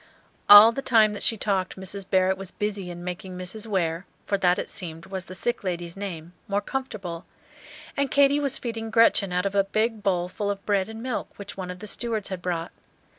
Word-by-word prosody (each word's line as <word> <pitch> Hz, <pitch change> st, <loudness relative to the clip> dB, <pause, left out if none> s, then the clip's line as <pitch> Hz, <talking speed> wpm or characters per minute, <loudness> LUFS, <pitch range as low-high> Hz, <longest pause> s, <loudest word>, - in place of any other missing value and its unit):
All 205 Hz, +2 st, +11 dB
the 275 Hz, -, -4 dB
time 220 Hz, -5 st, +4 dB
that 205 Hz, -, -6 dB
she 225 Hz, -, +2 dB
talked 195 Hz, -2 st, -1 dB
Mrs. 190 Hz, 0 st, -3 dB
Barrett 190 Hz, 0 st, +3 dB
was 190 Hz, -1 st, -8 dB
busy 205 Hz, -3 st, -3 dB
in 175 Hz, 0 st, -8 dB
making 180 Hz, +1 st, -6 dB
Mrs. 195 Hz, +5 st, -4 dB
Ware 175 Hz, -3 st, -1 dB, 0.2 s
for 200 Hz, -, 0 dB
that, 180 Hz, -2 st, +3 dB
it -, -, -3 dB
seemed, 170 Hz, -4 st, -6 dB
was 190 Hz, -2 st, -5 dB
the 185 Hz, -, -9 dB
sick 240 Hz, +4 st, -2 dB
lady's 175 Hz, -2 st, -4 dB
name 175 Hz, -4 st, -7 dB
more 200 Hz, 0 st, +1 dB
comfortable; 205 Hz, -8 st, -5 dB, 0.7 s
and 280 Hz, -1 st, 0 dB
Katy 285 Hz, 0 st, +4 dB
was 280 Hz, -2 st, 0 dB
feeding 225 Hz, -2 st, -5 dB
Gretchen 220 Hz, -4 st, +4 dB
out 180 Hz, +2 st, 0 dB
of 200 Hz, -, -1 dB
a 200 Hz, -1 st, +3 dB
big 215 Hz, +2 st, -1 dB
bowl 180 Hz, -3 st, 0 dB
full 200 Hz, +3 st, -3 dB
of 200 Hz, -1 st, -4 dB
bread 200 Hz, -1 st, +1 dB
and 220 Hz, +1 st, -8 dB
milk 255 Hz, -4 st, -3 dB
which 200 Hz, -, -8 dB
one 185 Hz, -2 st, -6 dB
of 180 Hz, -, -6 dB
the 215 Hz, -, -9 dB
stewards 220 Hz, -1 st, -1 dB
had 185 Hz, -2 st, -5 dB
brought. 170 Hz, -2 st, -3 dB
195 Hz, 215 wpm, -25 LUFS, 180-220 Hz, 0.7 s, All